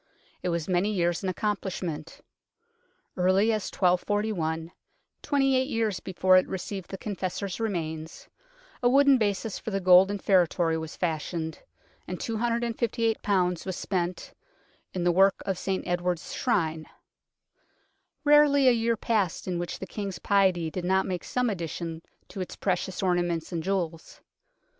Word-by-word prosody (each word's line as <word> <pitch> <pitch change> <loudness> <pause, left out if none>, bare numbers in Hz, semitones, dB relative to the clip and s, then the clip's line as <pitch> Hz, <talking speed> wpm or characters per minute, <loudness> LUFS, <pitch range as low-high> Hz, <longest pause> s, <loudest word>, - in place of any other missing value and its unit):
It 180 - -1
was 170 -2 -2
many 185 +2 +1
years 175 -4 0
in 190 - -1
accomplishment. 185 -5 -3 0.9
Early 190 +5 +3
as 215 -3 -2
1241, 180 -3 0 0.5
twenty 270 -2 +2
eight 260 0 +2
years 225 -6 0
before 185 0 +3
it 185 - +3
received 190 0 -5
the 195 - -5
Confessor's 195 -1 -4
remains, 160 -7 -4 0.5
a 245 - +4
wooden 275 0 +5
basis 205 0 -1
for - - -5
the 195 -2 -1
golden 185 +2 +6
feretory 175 -4 +2
was 160 0 -5
fashioned, 160 -1 -3 0.5
and 180 - -5
258 230 0 -1 0.4
was 190 -1 -4
spent 180 -2 -3 0.3
" - - -38
in 180 - -1
the 175 - +4
work 195 +2 +5
of 190 -2 -2
St 190 -1 -2
Edward's 175 -1 -2
Shrine." 160 -10 0 1.4
Rarely 290 -2 +5
a - - +8
year 230 -1 +1
passed 205 -8 -1
in 180 -2 -1
which 175 - -4
the - - -6
King's 195 -2 -5
piety 185 -4 +2
did 180 - -4
not 190 +2 +2
make 180 -2 -3
some 250 0 0
addition 170 -4 -4 0.3
to 195 - -6
its 185 - -6
precious 190 0 -2
ornaments 175 -3 0
and 170 -2 -2
jewels. 170 -3 -3
185 Hz, 145 wpm, -27 LUFS, 175-210 Hz, 1.4 s, a